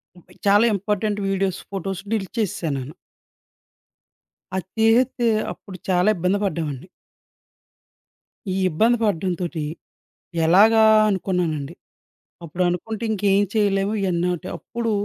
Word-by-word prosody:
మొబై 175 - -19
చాలా 205 +3 +5
important 205 +1 -1
videos, 190 -1 -1
photos 195 0 -4
delete 210 +2 -3
చేసేసాను 165 -8 -1
నేను. 140 +4 -8 1.6
అది 185 -2 -2
తీసేస్తే 235 +2 +3 0.3
అప్పుడు 190 -2 -12
చాలా 180 +3 +3
ఇబ్బంది 180 +3 0
పడ్డామండి. 155 -3 -3 1.7
ఈ - - -2
ఇబ్బంది 225 +9 +2
పడటంతోటి, 175 -4 -1 0.8
ఎలాగా 220 +6 +6 0.3
అనుకున్నానండి. 175 -7 -1 0.7
అప్పుడు 175 +3 -2
అనుకుంటే 220 +6 -4
ఇంకేం 200 -1 +2
చేయలేము 200 -1 +1
ఇయన్నోటి 180 -2 -1
అప్పుడు 230 -1 -4
195 Hz, 100 wpm, -22 LUFS, 175-210 Hz, 1.7 s, ఎలాగా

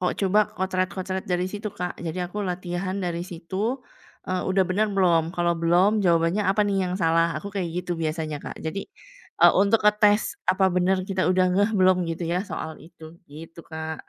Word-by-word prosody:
o - - -2
coba 205 +2 +2
kocret-kocret 185 0 -2
dari 180 0 0
situ 210 +1 -4
Kak. 180 0 -5
Jadi 170 +1 -4
aku 195 +4 -5
latihan 185 0 -3
dari 175 -3 -2
situ, 190 +8 -4 0.4
eee, 185 0 -2
udah 190 0 +3
bener 195 +4 0
belum? 170 -4 +3
Kalau 175 0 +2
belum 180 +6 +3
jawabannya 170 +2 +2
apa 195 +2 +2
nih 200 -1 0
yang 180 - -3
salah, 165 -2 +2
aku 200 +6 -5
kayak 190 -4 -2 0.2
gitu 175 - -2
biasanya 155 -2 -3
Kak. - - -7
Jadi, 175 +5 -3 0.6
eee, - - +8
untuk 205 +2 +2
ngetes 210 0 +3
apa 190 +1 +3
bener 185 +1 +1
kita 190 -2 0
udah 185 0 +3
ngeh 205 +4 +2
belum 185 -1 +5
gitu 165 +1 -3
ya 180 - +1
soal 160 -3 -6
itu, 160 +1 -15 0.2
gitu 165 +3 -11
Kak. 160 -1 -7
185 Hz, 185 wpm, -24 LUFS, 170-195 Hz, 0.6 s, eee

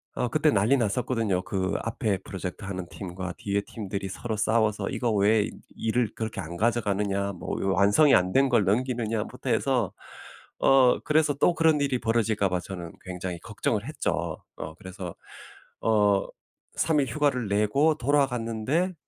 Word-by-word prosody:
어 125 - 0
그때 155 +5 +2
난리 110 +3 +3
났었거든요. 115 -4 0
그 95 -1 -2
앞에 110 -3 -1
프로젝트 95 +1 -6
하는 95 -2 -5
팀과 90 -1 -6
뒤에 100 0 -1
팀들이 100 -2 -5
서로 110 +3 -4
싸워서 110 -2 +1
'이거 120 -3 -1
왜 105 +1 +3 0.3
일을 115 0 0
그렇게 110 -1 -4
안 85 +2 -7
가져가느냐. 100 -3 0
뭐 90 - -5
요 95 -1 +1
완성이 105 +10 +5
안 90 0 +2
된 135 0 +4
걸 105 - +3
넘기느냐.'부터 115 0 -1
해서 - - +1 0.7
어 130 -2 +5
그래서 150 -1 +2
또 170 - +3
그런 160 -2 +3
일이 135 -3 +1
벌어질까 110 -3 +1
봐 90 0 0
저는 90 -3 -7
굉장히 90 -1 -5
걱정을 110 +1 -2
했죠. 155 - -3
어 80 0 -6
그래서 95 -2 -8 0.7
어 105 -3 +3 0.5
3 160 -2 +2
일 135 - -1
휴가를 140 -7 0
내고 120 +10 +3
돌아갔는데 135 +4 0
110 Hz, 320 characters per minute, -26 LUFS, 100-125 Hz, 0.7 s, 완성이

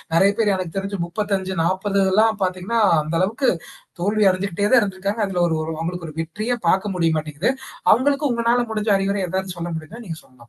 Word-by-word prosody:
நெறைய 195 +4 +5
பேர் 210 -3 +3
எனக்கு 185 -2 -5
தெரிஞ்சு 195 +1 -3
இப்பல்லாம் 195 +2 +1
பார்த்தீங்கன்னா, 185 +5 -1 0.2
அந்த 155 +2 -3
அளவுக்கு 225 +7 +1 0.5
தோல்வி 210 +3 +2
அடைஞ்சுகிட்டே 200 +2 -1
தான் 250 -3 +7
இருந்திருக்காங்க. 200 +2 -2
அதுல 180 -2 -1
ஒரு 160 - 0
ஓரு 160 +1 -3
அவங்களுக்கு 170 +1 -4
ஒரு 155 - -13
வெற்றியே 215 +9 -3
பார்க்க 195 +1 +1
முடிய 165 -2 +2
மாட்டேங்குது. 155 - -1 0.4
அவங்களுக்கு 280 +4 +3
உங்களால 235 +1 +2
முடிஞ்ச 215 -1 0
அறிவுரை 195 +1 -1
எதாவது 190 0 -3
சொல்ல 170 0 -4
முடியுமா 210 +10 -10
நீங்க 165 -3 -6
சொல்லலாம். 130 - -25
195 Hz, 170 wpm, -21 LUFS, 175-215 Hz, 0.5 s, தான்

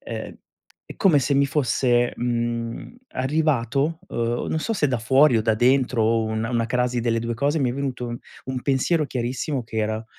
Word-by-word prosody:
ehm, - - -7 0.5
è - - -11
come 170 -7 +4
se 140 - 0
mi 140 0 +3
fosse, 125 -3 +1
mhmm, 120 - -3 0.2
arrivato, 140 +2 0
uhm, 120 +1 -2
non 160 - -1
so 225 - -2
se 150 -7 +1
da 125 -3 0
fuori 130 +3 +4
o 110 - 0
da 110 0 +2
dentro, 125 0 +2
o 115 +1 +2
un 110 0 -2
una 115 0 0
crasi 125 0 0
delle 115 -1 0
2 115 0 -3
cose 145 +6 0
mi 125 -3 +1
è - - -5
venuto 125 -3 -3 0.3
un 130 -1 -4
pensiero 145 +3 +1
chiarissimo 125 +2 -2
che 110 0 -8
era: 110 +1 -1
125 Hz, 190 wpm, -23 LUFS, 115-140 Hz, 0.5 s, come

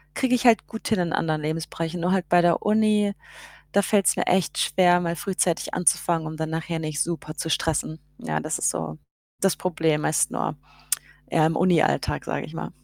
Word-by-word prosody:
kriege 255 -1 +1
ich 250 0 +1
halt 230 -2 +5
gut 225 - -7
hin 220 -4 +1
in 170 -2 -1
anderen 155 -1 0
Lebensbereichen. 165 +2 -4
Nur 180 - +1
halt 185 -2 0
bei 175 0 +5
der 175 -1 +2
Uni, 210 -1 +2 0.6
da 200 - +4
fällt's 200 -1 +2
mir - - -1
echt 185 -3 +1
schwer, 175 +2 +4
mal 170 -1 -1
frühzeitig 180 0 -1
anzufangen, 170 -1 +1
um 155 - -6
dann 160 0 -3
nachher 165 +1 -3
nicht 155 -2 -3
super 160 -2 -5
zu 165 - -3
stressen. 155 0 -1 0.2
Ja, 75 0 -3
das - - -3
ist - - +2
so 80 -2 -5 0.4
das 195 -2 +3
Problem 160 -4 0
meist 155 - +2
nur, - - -2 0.7
ja, 155 -1 +3
im 160 - +1
Unialltag, 175 -3 +2
sage - - -3
ich - - -12
mal. - - -5
170 Hz, 195 wpm, -24 LUFS, 155-185 Hz, 0.7 s, halt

